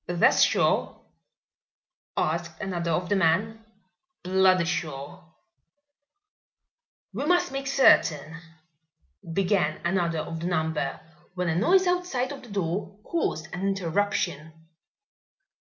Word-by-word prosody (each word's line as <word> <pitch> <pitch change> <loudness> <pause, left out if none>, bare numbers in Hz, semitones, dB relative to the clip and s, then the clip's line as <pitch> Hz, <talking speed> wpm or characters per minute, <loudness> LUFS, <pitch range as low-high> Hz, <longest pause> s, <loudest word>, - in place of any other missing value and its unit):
"That's 175 -1 +3
sure?" - - +2 1.2
asked 165 +1 -2
another 175 -4 -3
of 175 +2 0
the 205 - +1
men. 200 +6 +1 0.6
"Bloody 185 -1 +3
sure." 150 -4 -4 1.9
"We - - -3
must 355 -5 +2
make 275 0 -4
certain 165 - +3 0.5
" 80 - -15
began 185 -5 +1
another 170 -3 0
of 165 +1 -6
the 170 - -3
number, 160 -5 -1 0.4
when 180 -1 -1
a 160 - 0
noise 370 - +4
outside 355 -8 -1
of 280 - -8
the 245 - -14
door 195 +1 -3
caused 160 - -3
an 180 - -5
interruption. 195 -4 -1
180 Hz, 110 wpm, -26 LUFS, 160-205 Hz, 1.9 s, noise